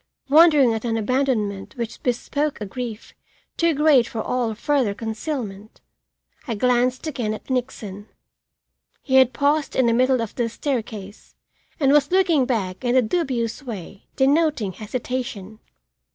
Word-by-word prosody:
Wondering 295 -5 +6
at 225 - -3
an 230 -2 -1
abandonment 220 -4 -1
which 235 -2 -5
bespoke 285 +4 -1
a 210 - -4
grief 230 +1 -7 0.4
too 335 -2 +2
great 285 -5 +4
for 225 - -6
all 235 -1 -1
further 250 -3 0
concealment, 220 -2 -5 0.7
I 230 - -2
glanced 250 +4 +1
again 245 -8 -2
at 240 - -10
Nixon. 220 -5 -4 1.0
He 265 -1 +2
had 260 -1 +6
paused 290 +2 0
in 260 - +3
the 230 - +3
middle 255 +2 +3
of 230 -2 -4
the 240 -2 -1
staircase 220 -5 -5 0.4
and 275 -3 +3
was 290 0 +4
looking 350 -8 +3
back 200 -5 -2
in 245 0 +1
a 260 - +6
dubious 245 -4 -1
way 200 -6 -9
denoting 280 - +2
hesitation. 220 -1 -5
245 Hz, 140 wpm, -22 LUFS, 220-275 Hz, 1.0 s, Wondering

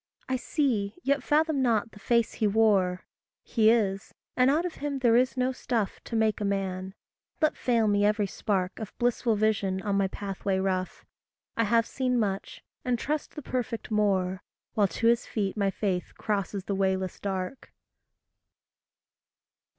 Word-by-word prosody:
I 260 - 0
see, 245 -7 0
yet 280 0 +2
fathom 305 +1 +2
not 230 -2 +1
the 205 - -14
face 235 +2 +1
he 215 - +1
wore. 200 -4 +2 0.4
He 220 -2 +3
is 200 -4 +1 0.2
and 255 +1 +4
out 315 +5 +2
of 355 - -3
him 285 -1 -2
there 240 -3 +4
is 255 +2 +2
no 255 +1 +2
stuff 230 -5 -2
To 230 - -5
make 220 -1 +1
a - - 0
man. 190 -1 -2 0.4
Let 310 -2 +2
fail 235 -3 +2
me 205 0 +3
every 210 0 +3
spark 190 -1 -2
Of 220 -2 -7
blissful 240 -1 +1
vision 205 -3 +1
on 200 -2 0
my 195 -1 +2
pathway 195 0 -3
rough, 185 -1 -2 0.5
I 230 - +2
have 230 +2 +3
seen 255 -1 -1
much, 195 -3 -3 0.2
and 250 -1 +1
trust 295 +5 -3
the 300 - -6
perfect 235 -3 -3
more, 190 -3 +1 0.3
While 205 -2 +3
to 190 +5 -4
his 235 +1 +3
feet 200 -3 -2
my 200 -2 +1
faith 190 -2 -2
crosses 200 -2 -2
the 200 - -3
wayless 190 -1 0
dark. 190 +5 -4
215 Hz, 165 wpm, -28 LUFS, 195-245 Hz, 0.5 s, and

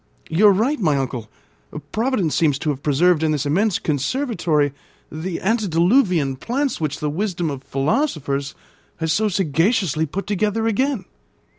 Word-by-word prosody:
"You 190 +7 +5
are - - +8
right, 235 +10 +1
my 155 -8 +2
uncle. 125 -4 -3 0.6
Providence 220 - 0
seems 150 -4 +2
to 150 +1 -1
have 140 -1 -6
preserved 155 +4 +3
in 155 -1 +1
this 145 -2 -1
immense 190 +7 +2
conservatory 155 - 0 0.4
the 165 +3 -4
antediluvian 180 - +2
plants 260 - -2
which 150 -2 -2
the 150 - -1
wisdom 175 -2 -2
of 135 -1 -7
philosophers 140 - -1 0.4
has 160 -2 0
so 215 +3 +1
sagaciously 170 - +1
put 195 +7 -4
together 210 +2 0
again." 225 -1 0
170 Hz, 145 wpm, -21 LUFS, 145-215 Hz, 0.6 s, are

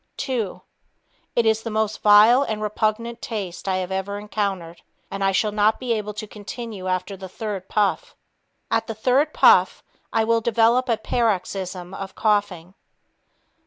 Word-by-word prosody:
Two... 240 -8 -3 0.7
It 235 - +2
is 220 0 +2
the 230 - -5
most 215 -1 -1
vile 215 +5 +7
and 220 -6 -2
repugnant 215 +2 -2
taste 195 -6 -5
I 190 - +1
have 185 0 -3
ever 190 +1 -3
encountered, 195 -5 -4 0.3
and 195 0 -3
I 195 - +3
shall 210 +2 +1
not 210 +1 +2
be 250 -2 -1
able 210 -1 -4
to 215 +1 -5
continue 210 -1 -7
after 185 +2 -2
the 190 -1 -9
third 200 -2 -6
puff. 205 -2 0 0.6
At 225 0 +1
the 225 - -5
third 260 +7 +2
puff, - - +4 0.3
I 225 - +2
will 230 +1 +2
develop 235 +3 +2
a 230 - +2
paroxysm 190 -5 -2
of 195 0 -7
coughing. 205 -5 0
210 Hz, 160 wpm, -23 LUFS, 195-225 Hz, 0.7 s, vile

